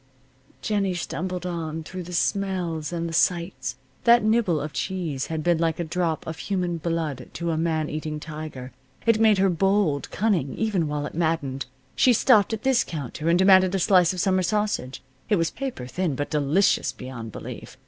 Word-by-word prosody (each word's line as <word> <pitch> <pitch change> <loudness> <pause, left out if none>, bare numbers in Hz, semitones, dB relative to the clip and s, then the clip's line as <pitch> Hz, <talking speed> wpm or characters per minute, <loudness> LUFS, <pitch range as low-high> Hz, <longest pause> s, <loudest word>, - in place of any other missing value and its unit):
Jennie 200 -3 0
stumbled 180 +1 -4
on, 165 -2 -4
through 185 +3 -7
the 180 0 -9
smells 175 -4 -1
and 170 -1 -2
the 165 - -6
sights. 170 -5 0 0.3
That 235 0 +6
nibble 215 -7 +2
of 150 0 -5
cheese 165 -3 -3
had 160 -1 -3
been 175 -1 +2
like 165 -1 0
a - - 0
drop 170 -1 -2
of 160 0 -6
human 180 -4 -1
blood 160 -6 -3
to 170 0 -2
a - - 0
man 160 -2 0
eating 155 0 -4
tiger. 150 -5 -7 0.3
It 230 -2 +4
made 220 -2 +5
her 195 +1 +4
bold, 190 -4 +1
cunning, 185 -11 0
even 200 -7 0
while 150 0 -2
it - - -6
maddened. 155 -6 -1 0.3
She 250 - +5
stopped 220 -3 +4
at 220 -1 -3
this 265 -2 +3
counter 155 +1 -4
and 170 - +4
demanded 190 0 +5
a - - +2
slice 180 -1 +4
of 185 - -5
summer 185 0 +2
sausage. 195 -8 -1 0.3
It 210 - +4
was 165 -3 0
paper 260 - -5
thin, 165 +2 -2
but 145 +2 -3
delicious 150 +6 +2
beyond 125 -3 -8
belief. - - -9
170 Hz, 185 wpm, -25 LUFS, 155-190 Hz, 0.3 s, That